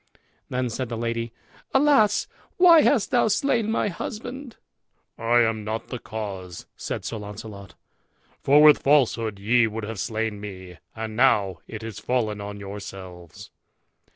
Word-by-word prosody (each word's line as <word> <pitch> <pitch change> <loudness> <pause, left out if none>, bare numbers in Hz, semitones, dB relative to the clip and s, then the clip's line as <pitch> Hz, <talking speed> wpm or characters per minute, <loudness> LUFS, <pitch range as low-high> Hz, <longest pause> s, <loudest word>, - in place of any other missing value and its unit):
Then 125 -1 -2
said 125 +1 -4
the 115 - -4
lady, 115 0 -3 0.4
"Alas! 265 -7 +4 0.3
why 345 -3 +8
hast 270 -7 +2
thou 245 -3 +3
slain 220 +1 +1
my 220 - +1
husband?" 245 +7 -7 0.6
"I 120 +1 +3
am 110 -2 0
not 110 +1 -4
the 125 - -5
cause," 95 -6 -7
said - - -5
Sir 115 - -4
Launcelot, 105 -1 -9 0.7
"for 145 +2 +5
with 150 -1 +7
falsehood 120 -7 +2
ye 115 +4 +3
would 110 0 -5
have 110 -1 -5
slain 110 -2 -3
me, 95 -4 -9 0.2
and 110 -1 -5
now 100 - +3
it 110 0 -8
is 110 -2 -7
fallen 110 -3 -1
on 100 0 -7
yourselves." 95 -4 -9
115 Hz, 145 wpm, -24 LUFS, 105-140 Hz, 0.7 s, why